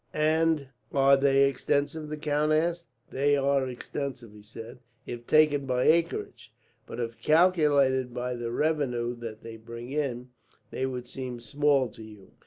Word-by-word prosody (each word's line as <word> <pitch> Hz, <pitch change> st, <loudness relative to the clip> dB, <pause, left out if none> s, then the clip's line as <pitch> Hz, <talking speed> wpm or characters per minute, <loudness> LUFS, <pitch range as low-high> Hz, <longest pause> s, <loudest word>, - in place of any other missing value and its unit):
"And 155 Hz, -2 st, +1 dB, 0.2 s
are 140 Hz, 0 st, +5 dB
they 135 Hz, 0 st, +4 dB
extensive?" 145 Hz, +3 st, -1 dB
the 155 Hz, -, -4 dB
count 150 Hz, 0 st, 0 dB
asked. 170 Hz, +2 st, 0 dB, 0.2 s
"They 145 Hz, +2 st, +2 dB
are 140 Hz, -1 st, +1 dB
extensive," 125 Hz, -2 st, -6 dB
he 105 Hz, -, -14 dB
said, 115 Hz, +3 st, -11 dB, 0.3 s
"if 120 Hz, 0 st, -8 dB
taken 150 Hz, -3 st, +3 dB
by 125 Hz, -1 st, +1 dB
acreage; 155 Hz, -8 st, 0 dB, 0.4 s
but -, -, -7 dB
if 115 Hz, -1 st, -5 dB
calculated 150 Hz, -6 st, +3 dB
by 125 Hz, +1 st, -3 dB
the 120 Hz, -1 st, -4 dB
revenue 125 Hz, -5 st, -1 dB
that 115 Hz, -2 st, -8 dB
they 115 Hz, -1 st, -9 dB
bring 115 Hz, +2 st, -9 dB
in, 130 Hz, -4 st, -3 dB, 0.4 s
they 130 Hz, -, -2 dB
would 125 Hz, -2 st, -6 dB
seem 125 Hz, -1 st, -6 dB
small 140 Hz, +3 st, +1 dB
to 110 Hz, -, -14 dB
you. 105 Hz, -3 st, -13 dB
135 Hz, 155 wpm, -27 LUFS, 120-150 Hz, 0.4 s, are